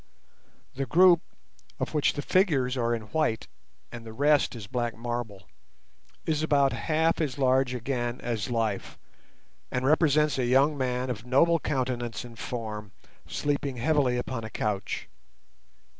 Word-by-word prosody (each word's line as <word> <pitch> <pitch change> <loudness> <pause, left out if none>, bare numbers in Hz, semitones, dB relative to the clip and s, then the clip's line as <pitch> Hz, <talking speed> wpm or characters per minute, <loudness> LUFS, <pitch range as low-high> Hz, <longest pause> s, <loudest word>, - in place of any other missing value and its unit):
The 135 0 -3
group, 175 0 +6 0.6
of - - -3
which 150 -2 +2
the 145 - -4
figures 145 -10 +2
are 120 -2 +1
in 115 - -6
white, 155 -8 0 0.5
and 120 -1 -8
the 110 -1 -9
rest 145 +2 +3
is 110 -3 -7
black 120 +2 -2
marble, 120 -4 -5 0.8
is 155 -1 0
about 140 -3 +3
half 160 +1 +1
as 140 -6 -2
large 130 -1 +2
again 120 -1 -2
as 115 -1 -3
life, 115 -4 -2 0.7
and 125 +1 -2
represents 150 -1 +3
a 125 - +1
young 135 +4 +4
man 125 -1 -1
of 110 -2 -6
noble 165 +6 +4
countenance 125 -6 -2
and 115 -2 -12
form 105 -4 -5 0.3
sleeping 140 -2 -2
heavily 135 -2 +2
upon 125 -1 -3
a 110 - -6
couch. 105 -3 -3
125 Hz, 145 wpm, -27 LUFS, 120-145 Hz, 0.8 s, group